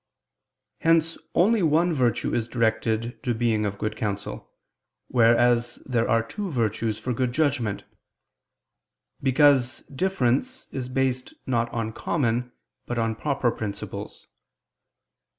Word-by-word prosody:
Hence 165 0 +3 0.2
only 215 +4 +4
one 165 +2 +3
virtue 125 -7 +1
is 115 -1 0
directed 115 0 0
to 120 -3 -1
being 110 -2 +1
of 100 0 -4
good 110 +1 -2
counsel, 100 -2 -4 0.6
wheres 120 0 +4
there 120 -3 0
are 115 0 +3
two 195 - -5
virtues 115 - -1
for 125 - -3
good 125 +1 0
judgment: 130 -9 0 1.4
because 135 -1 +4
difference 185 - -1
is 130 -2 -4
based 130 -1 -1
not 120 -2 0
on 115 -1 -3
common 125 -4 -1 0.4
but 120 - -3
on 115 -1 +1
proper 130 0 0
principles. 105 -3 -6
120 Hz, 115 wpm, -25 LUFS, 115-140 Hz, 1.4 s, only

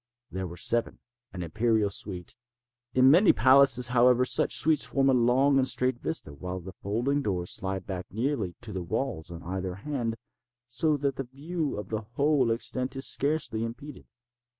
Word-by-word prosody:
There 95 0 -4
were 85 +1 -10
seven—an 120 -2 -3
imperial 110 +3 +1
suite. 95 -3 -6 0.6
In 130 +1 +6
many 185 +7 +6
palaces, 130 0 +5
however, 125 0 +4
such - - +2
suites 155 -1 +3
form 135 -1 +2
a - - +2
long 130 +3 +3
and 130 - +2
straight 125 -1 +1
vista, 75 - -3
while 90 +5 -6
the 95 +1 -10
folding 120 +8 -1
doors 90 -7 -2
slide 95 0 -3
back 95 -2 -5
nearly 110 -4 -2
to 115 -3 -8
the 95 - -3
walls 100 -3 -3
on 85 -1 -9
either 95 +1 -4
hand, 115 0 -3 0.5
so 145 +5 +1
that 140 -1 -2
the 135 - -3
view 150 0 -4
of 105 -2 -6
the 110 -1 -2
whole 140 -3 +2
extent 125 +3 -3
is 135 0 -2
scarcely 140 -6 0
impeded. 120 +5 -8
120 Hz, 170 wpm, -27 LUFS, 95-135 Hz, 0.6 s, In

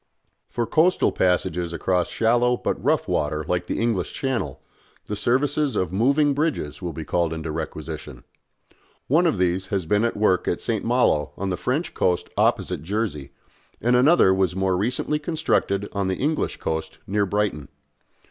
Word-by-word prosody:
For 120 - -1
coastal 165 +8 +3
passages 90 -2 0
across 90 +1 0
shallow 120 +2 +2
but - - -3
rough - - +1
water 75 +1 -1
like 90 0 -1
the - - -2
English 110 -6 -1
Channel, 120 - -2 0.5
the 105 - -4
services 135 +4 +1
of 90 -3 -1
moving 140 +8 +3
bridges 140 - -2
will 90 -2 -3
be 80 0 -7
called 85 +1 0
into 80 -1 -4
requisition. 75 -5 -6 0.8
One 165 +6 +4
of 160 - +1
these 90 +1 0
has 95 -5 -2
been 105 +6 +2
at 115 - 0
work 95 -4 +2
at 85 - 0
St. 115 -3 -1
Malo 115 -11 +2
on 95 0 -2
the - - 0
French 135 - -2
coast 90 -1 0
opposite - - +1
Jersey, 95 -6 -3 0.5
and 120 +1 +2
another 125 - +5
was 95 -1 +1
more 95 -1 +1
recently 125 +9 0
constructed 150 - 0
on 100 -1 -1
the 95 - -1
English 155 +3 -1
coast 80 0 -4
near 100 +1 0
Brighton. 100 -8 -1
100 Hz, 165 wpm, -23 LUFS, 90-125 Hz, 0.8 s, another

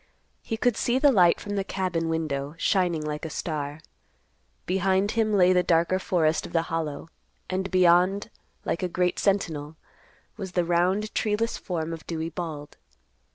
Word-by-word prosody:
He 225 - -4
could 245 0 +2
see 240 +2 +1
the 285 +1 +5
light 180 -7 +5
from 205 0 -5
the 195 - 0
cabin 180 -4 -2
window 150 -2 -2
shining 175 -4 +1
like 150 +1 -4
a 160 - -3
star. 150 -1 -4 0.8
Behind 190 +2 +1
him 225 -2 +1
lay 185 -3 +5
the 180 - +4
darker 170 +2 +2
forest 165 -4 +1
of - - -14
the 165 -1 +2
Hollow, 160 -1 -3 0.4
and 190 +1 -1
beyond, 185 +3 +3 0.3
like - - -1
a 180 - -1
great 180 0 0
sentinel, 160 -7 0 0.6
was 190 -4 -6
the 175 -1 +1
round, 180 +5 +1
treeless 220 +2 0
form 165 -2 -4
of 165 - -9
Dewey 165 -1 -3
Bald. 155 -4 -6
180 Hz, 160 wpm, -26 LUFS, 160-195 Hz, 0.8 s, the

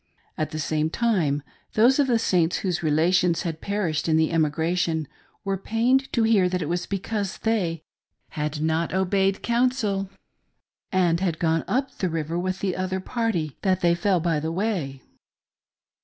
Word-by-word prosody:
At 155 - -2
the 155 - -6
same 155 0 0
time 165 -10 +1 0.3
those 245 +6 +4
of 285 - +4
the 240 -3 +3
Saints 180 -6 +1
whose 180 -2 0
relations 170 +3 +2
had 165 -3 -4
perished 185 -7 -1
in 160 - +4
the 160 0 +2
emigration 160 0 0 0.4
were 195 -1 -2
pained 245 +6 +1
to 230 - +2
hear 210 -5 +4
that 180 0 -1
it - - -4
was 175 +2 -2
because 200 0 -3
they 180 -8 -1 0.5
"had 150 0 -3
not 160 +2 0
obeyed 190 +1 +1
counsel," 235 -5 +1 0.8
and 175 -3 +2 0.2
gone 165 0 +1
up 265 +2 -1
the 185 - 0
river 165 +1 -2
with 185 +1 -3
the 190 -2 -1
other 185 +1 -2
party, 190 - -2
that 185 -1 +1
they 170 -2 +4
fell 180 +1 +1
by 165 -2 0
the 160 +2 -3
way. 170 -8 -2
180 Hz, 160 wpm, -24 LUFS, 160-200 Hz, 0.8 s, those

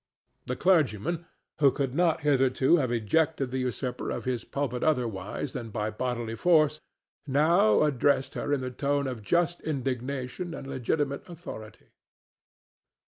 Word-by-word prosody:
The 125 - -1
clergyman, 165 - +1 0.3
who 140 -2 +6
could 135 -1 -2
not 165 +1 +2
hitherto 135 +1 +3
have 130 -6 0
ejected 135 +4 +1
the 130 - -1
usurper 125 0 -3
of - - -4
his 125 -2 -1
pulpit 135 -3 -3
otherwise 120 -4 -1
than 120 -3 -5
by 105 0 -2
bodily 120 0 -3
force, 155 +3 +3 0.5
now 145 -5 +4
addressed 140 -1 +2
her 145 - -3
in 145 -2 +1
the 130 0 -4
tone 140 +2 0
of 125 -4 -4
just 175 +9 +1
indignation 135 +3 -3
and - - -8
legitimate 140 +4 -2
authority. 155 -11 -10
135 Hz, 140 wpm, -28 LUFS, 125-155 Hz, 0.5 s, who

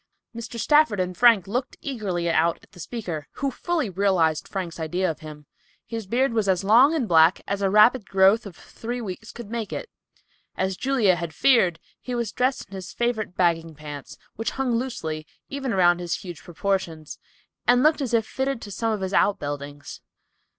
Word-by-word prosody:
Mr. 235 0 -6
Stafford 295 -3 +4
and 180 0 -1
Frank 230 -5 +5
looked 250 +7 -3
eagerly 200 -11 -3
out 165 0 +2
at - - -21
the - - -16
speaker, 170 -7 -5
who 275 0 -2
fully 335 0 -1
realized 180 -5 +1
Frank's 180 -4 -5
idea 175 +4 -1
of 155 - -10
him. 150 -1 -10 0.4
His 225 -4 -6
beard 245 +4 +1
was 215 -3 +1
as 190 0 +2
long 245 +10 +6
and 265 -8 0
black 165 0 +5
as 200 0 -2
a 195 - +2
rapid 215 +2 +5
growth 195 +3 +4
of 185 - -11
three 240 +2 -6
weeks 220 0 -7
could 235 -3 -10
make 230 -2 -3
it. - - -6 0.7
As 190 0 0
Julia 230 -7 +2
had 170 -2 -5
feared, 205 -11 +4 0.2
he 250 - -5
was 235 -3 -2
dressed 255 +3 0
in 190 - -16
his 190 -2 -7
favorite 225 -6 -2
bagging 165 -2 +1
pants, 145 -2 -9 0.2
which 225 - -1
hung 265 -2 0
loosely, 160 -11 -3 0.2
even 275 -2 -3
around 175 -3 +4
his 175 -1 -2
huge 175 -4 -8
proportions, 175 -4 -3 0.5
and 245 +1 +5
looked 310 0 +4
as 265 - -2
if 225 -1 +2
fitted 265 0 -2
to 205 - -8
some 225 +3 -1
of 215 -2 -2
his 190 +1 -3
outbuildings. 145 -7 -1
200 Hz, 185 wpm, -24 LUFS, 175-235 Hz, 0.7 s, long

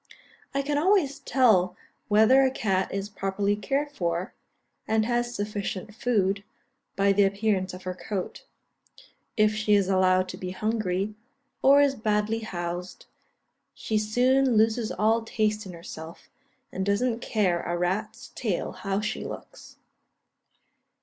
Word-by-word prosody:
I 275 - +1
can 290 +1 0
always 335 -5 +2
tell 190 -9 +3 0.3
whether 220 +6 +5
a 265 - +4
cat 195 -7 -1
is 195 0 -3
properly 200 0 -1
cared 275 +8 -2
for, 175 -4 -2 0.5
and 220 0 +2
has 240 0 -1
sufficient 205 -1 -4
food, 200 -4 0 0.5
by 200 0 +3
the 200 +1 +4
appearance 200 -1 0
of 180 +1 -10
her 185 - -3
coat. 185 0 -5 0.9
If 215 0 +4
she 215 -1 +2
is 200 -2 +2
allowed 185 -1 +3
to - - -6
be 185 - -5
hungry, 205 0 -1 0.5
or 280 +2 +6
is 285 -1 +3
badly 215 -2 0
housed, 175 -3 -5 0.7
she 215 -1 -1
soon 250 +3 +2
loses 220 +1 +2
all 225 +2 +2
taste 215 -2 -1
in 180 - -8
herself, 165 -1 -10 0.4
and 190 - -3
doesn't 225 +4 0
care 195 -8 0
a 175 - -2
rat's 210 +6 -2
tail 210 -8 -2
how 195 +2 -3
she 210 +1 -3
looks. - - -10
210 Hz, 135 wpm, -26 LUFS, 190-230 Hz, 0.9 s, or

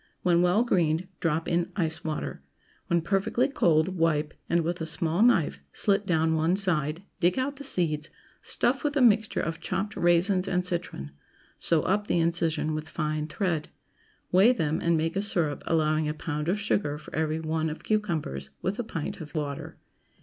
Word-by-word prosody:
When 175 -1 +4
well 180 +6 +3
greened, 175 -6 +1
drop 165 -1 0
in 170 0 0
ice 160 -4 -2
water. 155 - -4 0.5
When 170 -1 +1
perfectly 200 +7 +1
cold, 165 - +2
wipe, 155 -2 +1 0.2
and 170 0 +3
with 170 +1 -3
a 160 - -2
small 160 +3 0
knife 180 - +3
slit 200 0 +1
down 160 -1 +2
one 160 +3 +2
side; 170 -4 +1 0.2
dig 180 +4 +2
out 270 +2 -1
the 285 - -8
seeds; 160 - 0 0.3
stuff - - 0
with 295 -1 0
a - - +3
mixture 220 -2 +3
of 165 -1 -3
chopped 195 +4 -3
raisins 180 +2 +2
and 180 0 0
citron; 170 - -3 0.5
sew 165 -2 +2
up 205 +2 0
the - - +1
incision 165 -2 +1
with 155 0 -4
fine 155 -1 -2
thread. 165 -2 -2 0.6
Weigh 195 +7 +6
them, 160 -8 -1
and 170 -1 +2
make 165 +2 -1
a 195 - +1
syrup, 170 -8 +1
allowing 155 -1 +1
a 150 - -3
pound 150 0 -3
of 200 +3 +1
sugar 200 -7 0
for 150 - -13
every 155 0 0
one 160 0 -1
of 155 - -7
cucumbers, 160 - -2
with 190 +5 -3
a - - 0
pint 165 -9 -5
of 150 0 -10
water. 145 -2 -4
170 Hz, 180 wpm, -27 LUFS, 155-190 Hz, 0.6 s, Weigh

